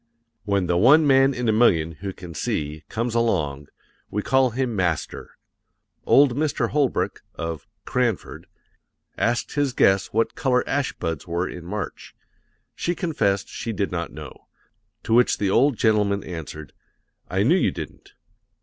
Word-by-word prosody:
When 100 -2 +1
the 85 0 +1
one 145 - +6
man 135 -1 +5
in 125 -1 -2
a - - +4
million 85 -8 +3
who 100 -1 -3
can 90 -3 -10
see 75 +1 -3
comes 115 +1 -2
along, 75 -12 0 0.4
we 105 0 -2
call 130 -1 +3
him 120 -1 -2
Master. 90 -5 -2 0.7
Old 140 -3 +5
Mr. 150 0 0
Holbrook, 145 -3 0
of 80 -2 -5 0.2
"Cranford," 120 -6 -2 0.7
asked 120 +1 0
his 145 -3 0
guest 95 -5 +3
what 115 +1 +1
color 125 -2 +1
ash 140 -1 0
buds 80 -2 -4
were 85 +2 -1
in 90 -1 -8
March; 105 +3 -6 0.6
she 175 - -2
confessed 120 - 0
she 115 - -5
did 100 -1 -2
not 85 -2 -3
know, 75 -3 -11 0.6
to 115 - -1
which 120 +1 +4
the 100 -2 0
old 130 +3 +3
gentleman 105 -3 +2
answered: 80 -4 -8 0.6
"I 95 +2 +1
knew 135 +10 +4
you - - +2
didn't. - - -9
105 Hz, 150 wpm, -23 LUFS, 85-125 Hz, 0.7 s, one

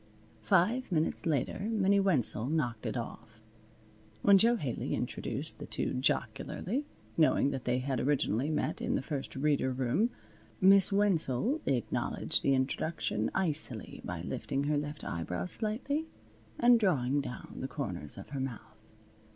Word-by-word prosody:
Five 200 - +2
minutes 160 0 0
later 145 -5 0
Minnie 200 -3 +3
Wenzel 135 - +2
knocked 125 -8 -1
it - - -2
off. 115 -1 -7 0.8
When 200 -1 +7
Jo 235 +4 +5
Haley 140 - -2
introduced - - -4
the - - -7
two - - -2
jocularly, 140 - -1 0.3
knowing 155 -3 +4
that 135 -2 -5
they 125 0 +1
had 130 -1 -1
originally 135 -1 +1
met 155 - -1
in - - 0
the - - -1
First 140 -2 -4
Reader 135 -2 +1
room, 130 - +1 0.5
Miss 195 +1 +6
Wenzel 200 - +2
acknowledged 125 -4 0
the 135 - +3
introduction 120 -5 -1
icily 155 - -1
by - - -5
lifting 140 +1 -2
her 150 +1 +1
left 150 0 -5
eyebrow 90 +1 -3
slightly 250 - -2 0.5
and 240 0 +6
drawing 145 - +2
down 125 - -8
the 130 - -3
corners 95 - -5
of 95 - -9
her 140 -1 -4
mouth. 115 -4 -6
140 Hz, 145 wpm, -31 LUFS, 125-190 Hz, 0.8 s, When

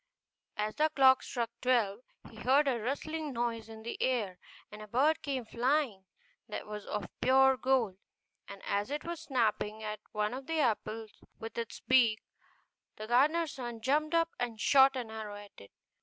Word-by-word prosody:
As 210 0 -1
the 310 +1 +2
clock 265 -3 +5
struck 235 -2 -3
twelve 230 -5 +2 0.3
he 220 - -15
heard 270 +6 +3
a 250 -3 +1
rustling 300 +6 -3
noise 230 -2 -2
in 220 0 -10
the 235 - -5
air, 220 -8 0 0.3
and 210 0 -9
a 215 - -9
bird 280 +8 +2
came 265 -4 -3
flying 240 -4 0 0.4
that 210 - -5
was 210 -1 -7
of 205 -4 -3
pure 265 +1 +5
gold; 245 -6 +1 0.5
and 200 -1 -10
as 205 +3 -1
it 295 +1 -3
was 340 -1 -5
snapping 220 -4 -1
at 215 0 -4
one 210 +1 -1
of 265 +1 -7
the 325 0 -1
apples 225 -4 -2
with 225 0 -8
its 230 -1 -5
beak, 240 -4 +3 0.7
the 215 - -7
gardener's 295 +7 +3
son 240 -3 -6
jumped 300 +7 +1
up 330 0 +3
and 240 -3 -3
shot 270 +3 +6
an 240 -4 -4
arrow 215 -2 -6
at 205 0 -11
it. 100 - -15
240 Hz, 175 wpm, -32 LUFS, 215-270 Hz, 0.7 s, shot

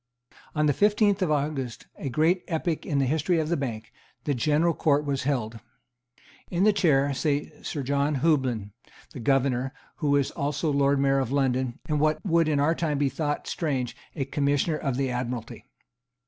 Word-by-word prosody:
On 150 0 +2
the 145 - +3
fifteenth 205 - +3
of 185 - +1
August, 145 -5 -2
a 140 - -5
great 160 +7 +2
epoch 165 -1 -2
in 145 - 0
the 135 - +3
history 160 +6 +1
of 160 -1 0
the 170 - +2
Bank, 115 -6 -5 0.3
the 145 - 0
General 155 +6 +2
Court 150 -1 +2
was 135 -2 -2
held. 115 -5 -1 0.9
In 175 +2 0
the 215 0 +5
chair 145 -8 +3
sate 145 +1 -2
Sir 145 - -3
John 140 +2 +1
Houblon, 130 -8 +1 0.4
the - - -7
Governor, 135 +1 +1 0.2
who 150 -3 -1
was 140 -2 +2
also 145 +2 -1
Lord 140 0 +3
Mayor 135 0 +3
of 130 -2 -2
London, 130 -3 0
and, 150 -1 0
what 155 +1 +2
would 170 -3 +3
in 150 -2 +1
our 150 +3 +3
time 160 -3 -1
be 140 -1 +2
thought 145 +2 -2
strange, 130 -7 -2 0.2
a 140 -4 -2
Commissioner 145 +2 0
of 135 -5 -2
the 135 -2 0
Admiralty. 125 -2 -4
145 Hz, 180 wpm, -26 LUFS, 135-155 Hz, 0.9 s, the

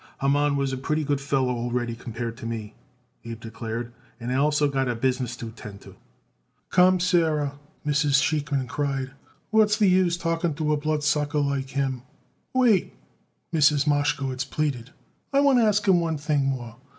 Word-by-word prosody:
"Haman 145 +1 +2
was 135 -1 -1
a - - -2
pretty 155 +4 -1
good 145 -1 -1
feller 135 -2 0
already 120 0 -2
compared 115 0 -5
to 130 - -7
me," 110 -2 -5 0.5
Abe 115 -1 -7
declared; 115 +1 -6 0.3
"and 125 +2 -3
also 145 +2 +2
I - - -3
got 120 -3 -2
business 125 -1 0
to 115 -2 -7
attend 105 -3 -11
to." - - -14 0.8
"Come, 185 +1 +5
Sarah," 160 -6 +1 0.3
Mrs. 145 -1 +3
Sheikman 145 -3 0
cried. 135 0 -2 0.4
"What's 215 -1 +4
the 210 - +4
use 180 -2 +3
talking 165 -2 -1
to 155 0 0
a - - +1
bloodsucker 150 0 0
like 140 -2 -1
him!" 135 -2 -2 0.5
"Wait!" 240 -8 +2 0.6
Mrs. 150 -2 +4
Mashkowitz 145 -3 0
pleaded; 135 -3 -2 0.4
"I 275 - +3
want 280 -3 +5
to 230 - +4
ask 210 -1 +1
him 185 -2 +5
one 165 -2 -1
thing 145 -1 0
more. 120 -4 -4
145 Hz, 165 wpm, -25 LUFS, 125-155 Hz, 0.8 s, Come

